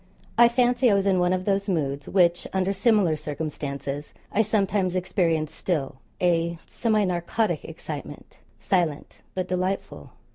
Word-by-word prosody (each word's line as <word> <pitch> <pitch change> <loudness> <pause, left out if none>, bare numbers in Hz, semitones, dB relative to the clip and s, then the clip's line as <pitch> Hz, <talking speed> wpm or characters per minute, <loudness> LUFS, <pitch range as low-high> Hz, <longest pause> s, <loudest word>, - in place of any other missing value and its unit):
I 240 - +7
fancy 245 +1 +3
I 205 - +4
was 195 0 +1
in 190 -2 +3
one 180 0 +2
of 185 0 -1
those 200 0 0
moods 140 -5 -1
which, 175 -2 +3
under 190 +1 +1
similar 195 -5 +3
circumstances, 145 -1 -5 0.2
I 215 - +3
sometimes 200 -3 +1
experience 165 -4 0
still 145 -8 -2 0.2
a 170 -1 +1
semi 215 -3 +1
narcotic 180 +5 -1
excitement, - - -8 0.2
silent 170 -6 -1
but 185 -1 -2
delightful. 185 +2 -3
185 Hz, 140 wpm, -25 LUFS, 165-200 Hz, 0.2 s, I